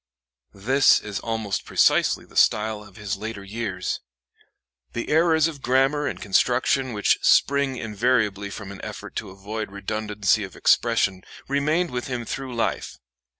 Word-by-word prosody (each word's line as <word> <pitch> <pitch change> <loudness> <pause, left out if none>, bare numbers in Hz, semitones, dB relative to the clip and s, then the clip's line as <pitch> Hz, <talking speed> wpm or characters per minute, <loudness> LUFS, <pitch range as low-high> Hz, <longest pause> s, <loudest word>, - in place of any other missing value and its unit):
This 130 +8 +4
is 100 -1 -5
almost 110 -3 -3
precisely - - +2
the - - -20
style 105 0 +2
of 100 -2 -17
his 105 -2 -4
later 105 -1 -6
years. 100 -2 -3 0.9
The 120 - -4
errors 160 0 +4
of 150 -4 -7
grammar 135 +4 +2
and 100 -9 -4
construction 125 +5 +1
which 105 -1 +2
spring 140 -2 +3
invariably 105 -3 0
from 100 -1 -8
an 100 - -9
effort - - -8
to 105 - -4
avoid 105 +3 -6
redundancy 105 0 -1
of 95 - -9
expression 95 -1 +2 0.3
remained 150 +5 +1
with 125 -1 -3
him 125 -3 -4
through 130 +1 -5
life. 115 - -2
110 Hz, 145 wpm, -24 LUFS, 100-130 Hz, 0.9 s, This